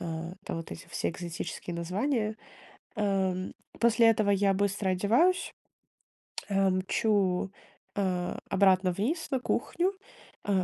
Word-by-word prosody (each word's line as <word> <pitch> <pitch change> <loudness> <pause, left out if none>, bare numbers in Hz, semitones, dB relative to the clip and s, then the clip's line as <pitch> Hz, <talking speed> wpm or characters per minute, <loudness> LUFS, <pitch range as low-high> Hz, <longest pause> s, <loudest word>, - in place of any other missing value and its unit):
а, 165 +1 -4
там - - -3
вот 165 - -6
эти 170 - -9
все 170 - -1
экзотические 170 0 -5
названия. 215 - -1 0.6
Ам, 190 -3 0 0.3
после 230 0 +5
этого 215 -2 +3
я 195 -1 +3
быстро 200 0 0
одеваюсь, 240 - +2 1.0
э, 195 -1 +3
мчу, 190 0 +1 0.4
а, 185 -3 -1
обратно 190 -1 +4
вниз 295 - -1
на 265 - +1
кухню. 350 +10 0 0.5
Э, 195 -2 +2
195 Hz, 120 wpm, -29 LUFS, 185-215 Hz, 1.0 s, после